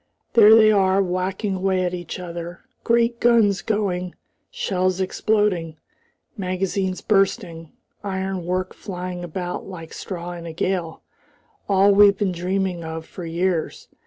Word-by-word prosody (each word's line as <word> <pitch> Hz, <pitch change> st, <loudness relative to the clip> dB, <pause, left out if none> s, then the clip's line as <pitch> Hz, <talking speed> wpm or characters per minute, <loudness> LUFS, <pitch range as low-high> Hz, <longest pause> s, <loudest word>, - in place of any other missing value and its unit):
There 220 Hz, -1 st, +8 dB
they 215 Hz, -1 st, +6 dB
are 195 Hz, -2 st, +3 dB
whacking 190 Hz, +2 st, -1 dB
away 185 Hz, 0 st, +1 dB
at 180 Hz, 0 st, -1 dB
each 175 Hz, -1 st, -5 dB
other, 175 Hz, -1 st, -7 dB, 0.2 s
great 235 Hz, 0 st, +2 dB
guns 225 Hz, -5 st, +4 dB
going, 185 Hz, -5 st, -2 dB, 0.3 s
shells 185 Hz, -1 st, -1 dB
exploding, 190 Hz, -4 st, 0 dB, 0.6 s
magazines 190 Hz, -1 st, -2 dB
bursting, 190 Hz, -6 st, 0 dB, 0.3 s
ironwork 190 Hz, -2 st, -2 dB
flying 180 Hz, -2 st, -6 dB
about 175 Hz, +1 st, -5 dB
like 165 Hz, -4 st, -9 dB
straw 175 Hz, -2 st, -6 dB
in 170 Hz, -1 st, -7 dB
a 165 Hz, -, -6 dB
gale, 170 Hz, -1 st, -2 dB, 0.7 s
all 195 Hz, +1 st, +5 dB
we've 200 Hz, 0 st, +6 dB
been 195 Hz, -2 st, 0 dB
dreaming 180 Hz, 0 st, -2 dB
of 160 Hz, 0 st, -6 dB
for 180 Hz, -, -9 dB
years! 170 Hz, 0 st, -2 dB
185 Hz, 130 wpm, -22 LUFS, 175-200 Hz, 0.7 s, There